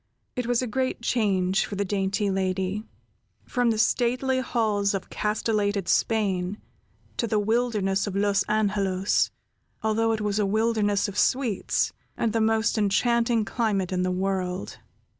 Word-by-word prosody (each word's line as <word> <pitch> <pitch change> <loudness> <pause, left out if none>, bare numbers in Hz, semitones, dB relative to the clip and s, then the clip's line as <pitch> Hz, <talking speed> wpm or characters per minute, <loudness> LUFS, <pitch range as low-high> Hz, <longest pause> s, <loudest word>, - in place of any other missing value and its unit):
It 250 -2 -2
was 245 +1 +1
a - - -2
great 255 +1 -2
change 195 -6 +1
for 205 - -5
the 200 +1 -1
dainty 200 +1 0
lady, 190 +2 -1 0.6
from 245 -2 +1
the 225 - +1
stately 255 +3 +1
halls 210 -5 0
of 190 - -6
castellated 210 -2 0
Spain 200 -3 +1 0.6
to 235 - 0
the 215 - +1
wilderness 210 -3 +1
of 195 - -4
Los 200 0 +2
Angelos, 200 -2 +1 0.5
although 225 +1 +2
it 220 -1 -1
was 210 0 0
a 210 - +2
wilderness 215 -1 +1
of 200 0 -3
sweets, 250 -7 +1 0.2
and 225 -2 0
the 225 - +1
most 220 0 +2
enchanting 230 +2 +2
climate 200 -4 -1
in 180 -1 0
the 185 - 0
world. 185 0 -2
210 Hz, 145 wpm, -26 LUFS, 195-225 Hz, 0.6 s, Los